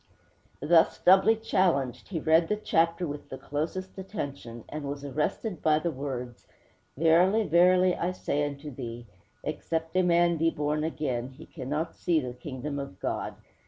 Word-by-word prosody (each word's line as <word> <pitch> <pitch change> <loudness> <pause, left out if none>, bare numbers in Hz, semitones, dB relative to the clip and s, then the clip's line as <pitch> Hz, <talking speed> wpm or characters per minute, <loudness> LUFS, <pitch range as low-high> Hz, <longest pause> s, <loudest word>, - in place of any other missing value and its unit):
Thus 165 +2 +4
doubly 195 +4 +5
challenged, 155 - 0
he 175 -5 -3
read 160 +2 +4
the 210 - +1
chapter 170 -3 +1
with 145 -2 -6
the 130 - -6
closest 175 +8 -4
attention, 140 - -6
and 155 -1 -6
was 140 0 -5
arrested 155 - -2
by 155 -1 +4
the 165 +2 -1
words: 130 -4 -6 0.5
'_Verily, 180 +7 +4
verily, 180 +2 +5
I 175 - -1
say 145 -5 -1
unto 145 +1 -5
thee, 120 -2 -7 0.4
Except 165 +1 -3
a 185 - +5
man 170 -1 +3
be 165 +1 +3
born 150 0 -1
again, 135 -6 -2
he 130 - -13
cannot 150 +3 -4
see 170 -3 +1
the 125 -4 -5
Kingdom 130 +3 -5
of 115 -10 -7
God! - - -3
155 Hz, 160 wpm, -28 LUFS, 140-175 Hz, 0.5 s, doubly